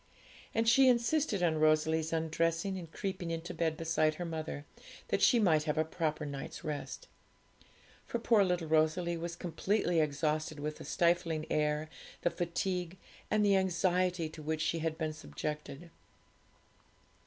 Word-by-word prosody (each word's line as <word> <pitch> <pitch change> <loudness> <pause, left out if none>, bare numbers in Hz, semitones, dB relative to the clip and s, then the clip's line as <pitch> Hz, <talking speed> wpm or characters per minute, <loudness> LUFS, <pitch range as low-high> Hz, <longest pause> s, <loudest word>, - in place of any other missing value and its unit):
And 225 0 +2
she 260 +3 +7
insisted 235 - +2
on 160 -2 +2
Rosalie's 155 +1 +2
undressing 165 +3 0
and 165 -3 -10
creeping 185 -3 -4
into 165 +1 -4
bed 160 -2 -1
beside 160 -1 +1
her 175 - -4
mother, 155 -3 -5 0.4
that - - +1
she 245 - +6
might 160 -8 +3
have 150 -1 -1
a 155 - +2
proper 155 -2 -2
night's 140 +2 -6
rest. 150 -3 -5 1.0
For - - -1
poor 230 -3 +4
little 180 -3 0
Rosalie 160 +2 +2
was 170 0 -4
completely 175 +1 0
exhausted 155 0 0
with 150 +1 -4
the - - -9
stifling 170 -2 +1
air, 150 0 +1 0.4
the 175 - +2
fatigue, 180 +1 -2 0.3
and 210 -1 +3
the 200 -1 +5
anxiety 180 -2 +1
to 155 0 -10
which 155 +1 -2
she 165 - 0
had 160 0 -2
been 155 -1 -2
subjected. 150 - -6
165 Hz, 150 wpm, -32 LUFS, 155-180 Hz, 1.0 s, she